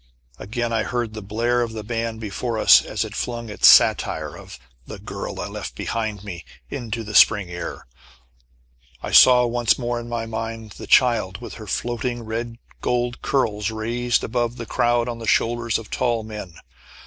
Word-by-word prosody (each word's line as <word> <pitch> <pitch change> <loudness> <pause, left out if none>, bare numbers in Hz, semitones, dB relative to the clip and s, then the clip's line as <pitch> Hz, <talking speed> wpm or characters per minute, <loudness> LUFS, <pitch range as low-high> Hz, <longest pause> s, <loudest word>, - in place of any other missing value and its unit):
Again 115 +3 -3
I 115 - +1
heard 120 -1 -2
the 110 - -6
blare 115 +4 0
of 115 -2 -2
the 110 -1 -6
band 115 0 -3
before 115 +2 -3
us - - +7
as - - -2
it - - -8
flung 120 -2 -4
its 105 - +4
satire - - +4
of - - -11 0.3
"The - - -7
Girl - - -7
I - - -3
Left - - -7
Behind 110 -3 -3
Me," 90 -5 -7 0.3
into 120 -4 -4
the 105 0 -8
spring 100 -4 +5
air. 85 0 -6 1.2
I - - -4
saw 125 -1 +7
once 120 -1 +1
more 120 -1 -2
in 120 0 -8
my 115 -1 -3
mind 115 -1 -5
the - - -10
child, 110 -7 +3
with 120 - -9
her 110 - -9
floating 120 +3 -3
red 115 +1 -5 0.2
gold 120 0 -1
curls, 105 -6 0
raised 115 +2 -1
above 120 0 -1
the 115 - -6
crowd 120 +1 +1
on 120 -1 -4
the 115 - -7
shoulders 115 +1 +1
of 115 - -10
tall 120 -3 0
men. 105 -6 -8
115 Hz, 180 wpm, -22 LUFS, 110-120 Hz, 1.2 s, us